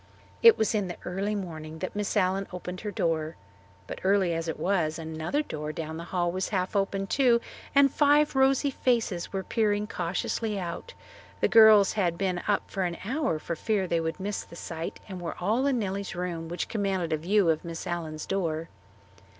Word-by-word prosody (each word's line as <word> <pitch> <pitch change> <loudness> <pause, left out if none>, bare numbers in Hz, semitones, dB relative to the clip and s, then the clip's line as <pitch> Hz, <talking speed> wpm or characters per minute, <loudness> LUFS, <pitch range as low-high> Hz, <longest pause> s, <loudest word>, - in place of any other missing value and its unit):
It 460 -2 +8
was 220 0 +1
in 205 -3 0
the 175 - -6
early 195 +4 -2
morning 160 -5 -6
that 185 +4 -5
Miss 205 -1 -1
Allen 190 +1 +1
opened 180 0 -6
her 210 - -3
door. 165 -4 -1 0.5
But - - -7
early 190 -2 +3
as 165 0 -2
it 160 - -3
was, 170 -5 +1
another 160 - -2
door 150 - -5
down 160 +1 -5
the 170 - -6
hall 175 -1 0
was 185 +1 -2
half 185 -1 -1
open 195 0 0
too 240 +2 +3 0.4
and 280 -1 +6
five 295 0 +4
rosy 270 +1 +3
faces 230 -9 0
were 195 -1 -2
peering 210 -1 +1
cautiously 200 +4 -2
out. 180 - -6 0.4
The - - +3
girls 215 -3 +7
had 175 -5 0
been 185 -2 -1
up 205 -1 +1
for 195 - -2
an 175 -2 -1
hour 265 - 0
for 170 +2 -4
fear 205 +2 0
they 170 -2 0
would 160 +2 -3
miss 200 +2 -3
the - - -13
sight 165 -1 -6
and 185 -3 -7
were 170 - -5
all 225 +9 +1
in 270 -3 +2
Nellie's 200 -3 -3
room, 175 -2 -3
which 175 - -3
commanded 195 -6 -1
a - - +2
view 180 +2 +3
of 155 - -2
Miss 165 0 -6
Allen's 160 -3 -4
door. 165 -4 -2
185 Hz, 195 wpm, -28 LUFS, 170-210 Hz, 0.5 s, It